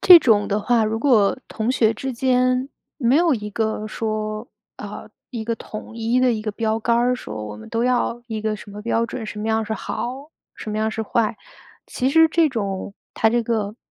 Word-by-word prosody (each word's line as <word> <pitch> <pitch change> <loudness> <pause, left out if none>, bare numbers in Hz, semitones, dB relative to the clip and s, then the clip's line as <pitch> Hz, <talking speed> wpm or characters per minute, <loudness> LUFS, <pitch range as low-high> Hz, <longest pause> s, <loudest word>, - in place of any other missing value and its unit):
这 360 -2 +10
种 215 -7 +3
的 205 +1 +1
话， 225 +1 +2
如 220 +1 -1
果 225 -5 +3
同 225 +2 -2
学 225 -3 +3
之 265 +4 -4
间 255 +1 +2 0.3
没 245 -3 +2
有 330 +1 +4
一 210 -4 -2
个 220 0 -1
说， 215 +1 -3 0.3
呃， - - -8 0.2
一 230 -3 -4
个 230 - -1
统 225 +1 -9
一 230 +2 +1
的 255 -1 +4
一 215 -1 -3
个 215 - -2
标 220 +1 -1
杆 235 +1 +2
儿 245 +1 +3
说 110 - -6
我 105 0 -7
们 110 - -11
都 230 +1 0
要 245 -1 +1
一 220 -2 -4
个 215 -1 -1
什 205 - -12
么 210 0 -8
标 230 0 +1
准， 230 -1 -5
什 210 0 -6
么 215 - -3
样 220 0 +1
是 220 - -4
好， 260 +8 -5 0.3
什 215 - -6
么 210 - -3
样 220 0 +1
是 220 - -3
坏？ 220 0 0 0.5
其 260 +1 -1
实 325 +2 +6
这 320 -1 +3
种 200 -5 -3 0.2
它 220 - +3
这 235 -1 +1
个 215 -2 -1
225 Hz, 235 characters per minute, -22 LUFS, 215-250 Hz, 0.5 s, 这